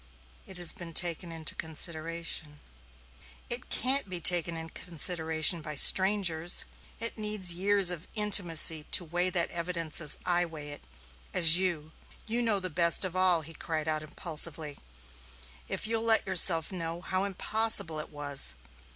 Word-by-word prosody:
"It 190 - -12
has 175 -2 +1
been 170 -2 -12
taken 170 0 -2
into 160 -1 -2
consideration." 160 -1 -5 0.9
"It 240 +1 -5
can't 265 -4 0
be 180 -1 -7
taken 170 0 +4
into 160 0 -9
consideration 160 -1 +3
by 150 0 -9
strangers 185 -1 +4 0.3
it 230 -1 -5
needs 210 -4 0
years 195 +1 0
of 170 -2 -8
intimacy 175 -7 +3
to 175 - +2
weigh 175 +3 -2
that 175 -2 -3
evidence 170 -2 -5
as 150 - 0
I 175 -1 0
can 175 - -4
weigh 150 -2 -10
it 145 - -11 0.5
as 170 -1 +6
you 165 -5 -4 0.3
You 235 +2 -2
know 225 -4 -1
best 175 0 +2
of 185 -1 -7
all," 185 -3 +1
he 160 +2 -12
cried 160 -1 -5
out 155 -1 -3
impulsively, 155 -1 -1 0.9
"if - - -5
you'll 225 0 -2
let 225 -2 0
yourself 175 -3 +3
know, 170 -2 -7
how 185 +1 -4
impossible 200 -4 0
it 155 - -9
was. 145 -2 0
170 Hz, 150 wpm, -28 LUFS, 160-185 Hz, 0.9 s, as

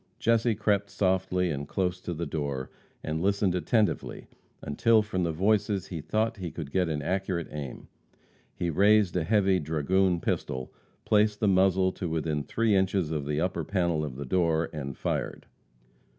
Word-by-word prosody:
Jesse 115 0 +2
crept 100 -1 +1
softly 95 -2 +1
and 70 -1 -4
close 90 -1 -1
to 90 - -4
the 85 +2 -3
door, 70 -3 -3 0.3
and 80 +1 -2
listened 100 0 +1
attentively 105 +5 0 0.4
until, 110 +10 +3
from 95 -3 -2
the 85 -2 0
voices, 100 +3 +1
he 85 -4 -5
thought 110 +7 -1
he 90 -3 -4
could 80 -2 -7
get 90 -3 +1
an 75 -2 -2
accurate 95 -1 -2
aim. 70 -4 -7 0.7
He 85 -1 -1
raised 100 +2 +4
a 90 - +1
heavy 95 0 +3
dragoon 85 +4 +1
pistol, 65 -5 -3 0.3
placed 105 0 +3
the 105 - +1
muzzle 95 -1 +3
to 90 -2 -5
within 80 -2 -1
three 110 +9 0
inches 95 -4 +1
of 75 -3 -2
the 75 0 -1
upper 90 +3 -1
panel 85 -5 0
of 70 -4 -5
the 70 +2 -6
door, 80 +1 +1
and 70 -3 -5
fired. - - -3
90 Hz, 165 wpm, -28 LUFS, 80-100 Hz, 0.7 s, raised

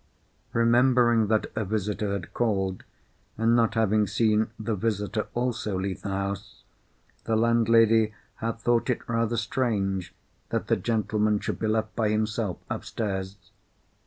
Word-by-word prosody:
Remembering 120 -1 +4
that 110 0 +1
a 110 - 0
visitor 105 0 -2
had 100 -4 -5
called, 95 -5 -1 0.5
and 115 +1 +3
not 115 -1 +2
having 110 -1 +2
seen 110 +1 +2
the 110 0 -2
visitor 105 0 -1
also 120 -5 -1
leave 95 0 -3
the - - -4
house, 100 0 -4 0.6
the 110 - +1
landlady 115 -1 +4 0.3
had 115 0 -3
thought 120 +2 +1
it 125 - -1
rather 115 0 0
strange 100 -6 -1 0.3
that - - -1
the - - +4
gentleman 105 -2 0
should - - -4
be 110 - -1
left 110 0 -1
by 110 -2 +1
himself 110 -2 -1
upstairs. 95 -3 -4
110 Hz, 135 wpm, -26 LUFS, 105-115 Hz, 0.6 s, Remembering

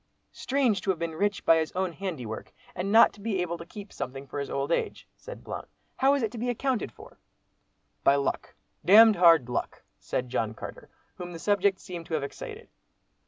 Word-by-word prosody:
"Strange 255 -7 +1
to 195 - -4
have 190 - +2
been 165 0 -3
rich 200 +4 -1
by 165 - +6
his 160 -1 -1
own 185 -1 -1
handiwork, 155 - -6 0.2
and 190 +3 -3
not 225 +2 +7
to 205 - -15
be 205 -3 -1
able 175 -1 -1
to 170 0 -10
keep 205 +2 -10
something 135 +2 -6
for 145 - -6
his 140 - -4
old 140 +3 -2
age," - - -2
said - - -10
Blount; - - -6 0.3
"how 270 +1 +4
is 275 - -1
it 220 - -1
to 235 - -7
be 245 +2 -1
accounted 245 - -1
for?" - - -15 0.8
"By 140 - +5
luck, 140 -1 -2 0.3
d—d 215 0 +7
hard 165 -7 +6
luck!" 125 - -4 0.2
said 125 - -3
John 110 -2 -1
Carter, - - -9 0.3
whom 175 -1 -7
the - - -6
subject 200 +1 +1
seemed 175 -3 -8
to 160 - -2
have 150 - -1
excited. 140 - -8
180 Hz, 205 wpm, -27 LUFS, 155-210 Hz, 0.8 s, not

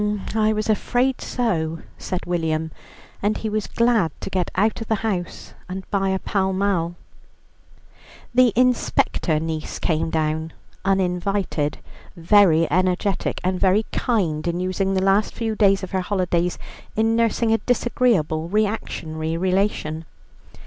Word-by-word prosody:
"Um! 210 -1 -1
I 215 -1 +3
was 215 0 -1
afraid 245 +4 +1
so," 165 -10 -1 0.2
said 185 - -4
William, 160 -2 -1 0.5
and 210 +2 +1
he 220 - -3
was 215 -1 -2
glad 230 -8 +2
to - - -5
get 185 -2 0
out 215 +4 +1
of 225 - -5
the 220 - +2
house, 180 -5 -3 0.2
and 190 0 -6
buy 195 -1 +1
a 190 - +1
Pall 190 0 -1
Mall. 185 -3 0 1.4
The 250 -1 +5
inspector 240 -9 +2
niece 160 -1 -4
came 160 -1 0
down 160 0 -1 0.3
(uninvited), 185 -4 0 0.4
very 170 -2 +5
energetic, 185 +2 0
and 185 0 0
very 195 +3 +3
kind 175 -10 0
in 170 +1 -1
using 190 +1 0
the 190 - +1
last 195 +2 +2
few 225 -2 -2
days 195 -2 +3
of 190 - -5
her 190 -1 0
holidays 180 -2 0 0.4
in 225 +1 +2
nursing 230 0 +2
a 225 - +2
disagreeable 205 -11 +1
reactionary 165 -6 -2
relation. 185 -4 0
190 Hz, 140 wpm, -22 LUFS, 170-215 Hz, 1.4 s, The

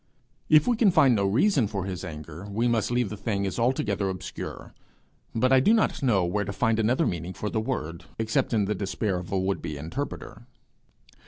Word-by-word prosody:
If 155 -1 +6
we 240 - +2
can 220 -3 +5
find 155 -8 +5
no 100 -3 +2
reason 130 - +3
for 100 -2 -3
his 95 -2 -5
anger, 80 +2 -8
we 115 +4 0
must 115 -3 +1
leave 120 -3 0
the - - -4
thing 100 -2 -1
as 95 - -3
altogether 105 -5 0
obscure; 95 -1 -7 0.7
for 130 +3 +3
I 130 - +7
do 210 - +4
not 220 - +1
know 105 -9 +2
where 105 +4 0
to 100 - -4
find 115 +1 +1
another 125 +8 +2
meaning 85 +1 -3
for 105 - -4
the 110 - 0
word, 85 - -4
except 110 0 0
in 105 -4 +2
the 105 - 0
despair 100 -1 -2
of 90 - -9
a 95 - +1
would 95 +1 -1
be 75 - -5
interpreter. 115 - -6
105 Hz, 210 wpm, -26 LUFS, 95-125 Hz, 0.7 s, I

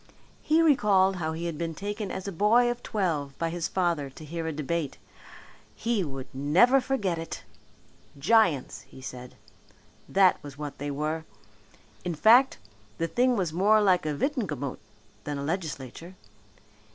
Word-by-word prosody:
He 320 +2 +3
recalled 195 - +4
how 160 -2 -2
he 165 +2 -4
had 165 -3 -4
been 165 -1 -3
taken 205 +3 -4
as 190 - -5
a - - -2
boy 225 +7 +4
of 240 0 -6
twelve 155 -9 -2
by 165 -1 -1
his 170 -1 -2
father 170 -7 0
to 155 +4 -12
hear 165 +1 -4
a - - -1
debate. 155 0 -3 0.8
He 230 -4 0
would 135 -4 -6
never 180 - +4
forget 200 -11 -1
it. 165 - -6 0.7
Giants! 165 - +2
he - - -13
said, 125 -1 -9 0.7
that 190 -2 +4
was 140 -1 -10
what 145 -1 -6
they 145 +1 -3
were. 155 +3 -2 0.8
In 175 -2 -2
fact, 240 - +5 0.4
the 165 - -1
thing 250 +7 +2
was 180 -7 -1
more 205 +5 +4
like 185 -6 +3
a 150 - -1
Witenagemot 150 - -2 0.4
than 145 -1 -4
a 140 - -4
legislature. 160 0 -5
170 Hz, 155 wpm, -27 LUFS, 150-205 Hz, 0.8 s, fact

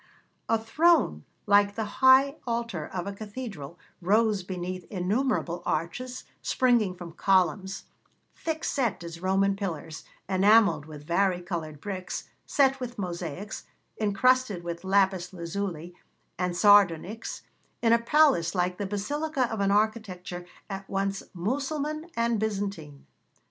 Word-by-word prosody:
A 225 - +4
throne, 225 - +2 0.2
like 205 0 +4
the 220 - -2 0.2
high 265 +2 +6
altar 230 -9 -2
of 180 -1 -4
a 200 - -4
cathedral, 205 - -7 0.2
rose 210 +2 +3
beneath 185 0 -5
innumerable 190 -1 -1
arches 245 +11 -3 0.2
springing 235 -7 +2
from 175 -2 -9
columns, 190 +1 +1 0.5
thick 320 -1 -4
set 240 -10 -1
as 170 0 -8
Roman 195 +1 +2
pillars, 165 -5 -5 0.2
enamelled 200 -4 +4
with 150 -2 -10
vari 180 +2 +2
coloured 165 -4 -5
bricks, 185 0 -5 0.2
set 270 -1 +3
with 245 -1 -6
mosaics, 180 +1 -5 0.3
incrusted 215 -1 +2
with 170 0 -5
lapis 190 -2 +2
lazuli 175 -1 -4 0.4
and 180 -1 -2
sardonyx, 205 +1 +3 0.4
in 230 0 +5
a 235 - +5
palace 235 - +3
like 180 0 0
the 205 - -2
basilica 265 +7 -1
of 220 - -3
an 200 0 +2
architecture 200 -4 -1 0.2
at 195 -1 -7
once 195 0 -1
Mussulman 285 - -2
and 230 -1 +1
Byzantine. 195 -9 -4
195 Hz, 125 wpm, -27 LUFS, 180-230 Hz, 0.5 s, high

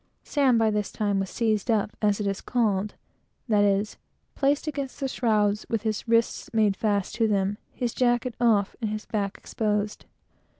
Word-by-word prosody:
Sam 270 -5 +3
by 220 -1 +3
this 210 -1 -1
time 205 -3 0
was 195 -1 -2
seized 220 -1 0
up, 215 -2 +1
as 205 -1 +2
it 210 - -2
is 195 -1 -2
called, 210 -4 0 0.5
that 210 -3 +3
is, 200 +1 +1 0.4
placed 285 +1 +1
against 280 -4 -4
the 275 - -1
shrouds, 210 -5 +1
with 225 -2 -1
his 220 0 -2
wrists 230 0 +1
made 210 -3 +3
fast 205 -2 0
to 225 -2 +3
the 210 - +2
shrouds, 195 +1 0
his 240 -2 -3
jacket 240 -1 +1
off, 210 -4 +3
and 220 - -1
his 215 0 -4
back 200 -2 -2
exposed. 210 -1 -2
215 Hz, 180 wpm, -26 LUFS, 205-235 Hz, 0.5 s, Sam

